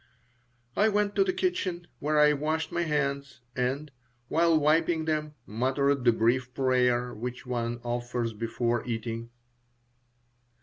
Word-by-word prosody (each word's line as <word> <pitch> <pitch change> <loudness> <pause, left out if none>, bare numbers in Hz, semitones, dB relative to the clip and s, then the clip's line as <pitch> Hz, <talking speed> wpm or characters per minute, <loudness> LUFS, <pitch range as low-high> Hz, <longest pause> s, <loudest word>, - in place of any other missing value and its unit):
I 215 +2 +4
went 205 -1 0
to - - +5
the 380 - +1
kitchen, 190 - -1
where 150 +1 +1
I 150 0 +6
washed 155 +2 -1
my 175 - 0
hands, 140 -5 -2
and, 135 +4 -1 0.4
while 165 -1 +4
wiping 160 +2 +2
them, 155 -1 -2
muttered 130 +4 0
the 120 - +7
brief 125 +3 +1
prayer 125 -2 +2
which 125 +4 -6
one 120 -1 -2
offers 120 -1 -2
before 115 +1 -1
eating. 115 0 -4
135 Hz, 130 wpm, -28 LUFS, 120-155 Hz, 0.4 s, the